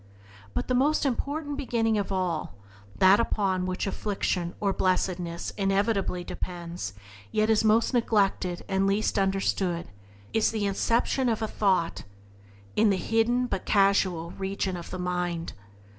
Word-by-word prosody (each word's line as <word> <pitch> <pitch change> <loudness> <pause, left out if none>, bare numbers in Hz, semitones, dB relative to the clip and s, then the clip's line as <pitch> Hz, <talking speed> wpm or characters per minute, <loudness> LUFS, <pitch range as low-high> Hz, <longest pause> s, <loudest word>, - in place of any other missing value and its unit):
But - - -1
the 255 - 0
most 290 +5 +2
important 285 +3 -2
beginning 230 -5 0
of 200 - -3
all 175 - -2 0.2
— 100 0 -23
that 190 +2 +6
upon 190 -5 0
which 185 0 -2
afflication 195 -4 -2
or 200 -2 +1
blessedness 180 -2 -1
inevitably 195 -2 +1
depends, 170 - -5 0.4
yet 215 +1 +2
is 220 0 +3
most 220 +3 +3
neglected 200 -6 +1
and 195 0 +1
least 200 +1 +1
understood 190 -3 0 0.2
— 100 0 -24
is 220 - +3
the 215 -2 -1
inception 235 +5 +1
of 225 - +1
thought 195 -6 0 0.7
in 215 0 +4
the 195 - +2
hidden, 225 +6 +1
but 195 -6 -4
causal, 195 -4 +2
region 190 -1 -3
of 170 -1 -7
the - - -5
mind. 180 -2 -2
195 Hz, 145 wpm, -27 LUFS, 180-220 Hz, 0.7 s, that